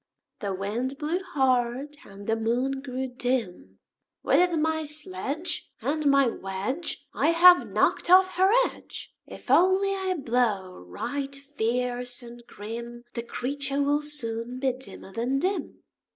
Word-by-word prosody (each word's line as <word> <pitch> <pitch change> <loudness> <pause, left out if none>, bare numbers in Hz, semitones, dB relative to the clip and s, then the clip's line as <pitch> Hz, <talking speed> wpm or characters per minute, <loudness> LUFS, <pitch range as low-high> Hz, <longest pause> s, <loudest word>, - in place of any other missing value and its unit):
The 200 -2 -2
Wind 230 +8 -3
blew 310 +4 -1
hard, 265 -4 0
and 200 +1 -12
the 225 - +1
Moon 245 +4 -1
grew 260 -1 -4
dim. 245 - -3 0.5
"With 340 +4 +3
my 315 +1 0
sledge 300 - -4
And 300 +1 -1
my 275 -1 +5
wedge 225 - -3
I - - +1
have 355 +2 +7
knocked - - +1
off 370 +1 +7
her 375 +1 +3 0.2
edge! - - -10
If - - -7
only 375 +2 +5
I 380 -1 -1
blow 230 - 0
right 275 - -4
fierce 250 -2 -2
and 240 0 -11
grim, 235 +3 -7
The 235 - -3
creature 275 +4 -2
will 290 +1 +2
soon 245 -4 -1
be 265 0 +2
dimmer 255 -6 -9
than 245 +5 0
dim." 370 +7 -2
260 Hz, 135 wpm, -27 LUFS, 235-300 Hz, 0.5 s, have